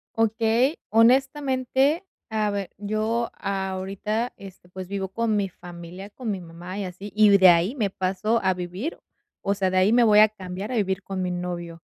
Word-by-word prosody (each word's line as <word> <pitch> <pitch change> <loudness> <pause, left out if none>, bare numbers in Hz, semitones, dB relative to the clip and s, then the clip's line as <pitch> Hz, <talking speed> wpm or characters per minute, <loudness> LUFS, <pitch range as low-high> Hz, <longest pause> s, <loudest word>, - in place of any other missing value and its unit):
Okey, 225 +5 +2
honestamente, 265 - +2 0.2
a 215 -1 0
ver, 200 -2 -3
yo 215 +3 -1
ahorita 195 +4 -3
este, 190 -2 -13
pues, 185 0 -8
vivo 195 -1 -3
con 220 +2 -1
mi 200 -1 0
familia, 175 +1 -10
con 235 +2 -6
mi 195 -2 -4
mamá 175 +2 -9
y 205 - -2
así, 185 +2 -8
y 215 0 +6
de 190 -1 +7
ahí 175 +7 +4
me 215 -7 0
paso 195 +5 -1
a 190 0 +3
vivir 180 - -5 0.4
o 200 - +1
sea, 190 -2 0
de 185 - 0
ahí 185 +3 +4
me 240 0 +5
voy 210 -2 +6
a 215 - +8
cambiar 195 +1 -7
a - - -2
vivir 195 -3 0
con 190 -1 -5
mi 180 - -1
novio. 175 -2 -5
200 Hz, 185 wpm, -24 LUFS, 185-225 Hz, 0.4 s, a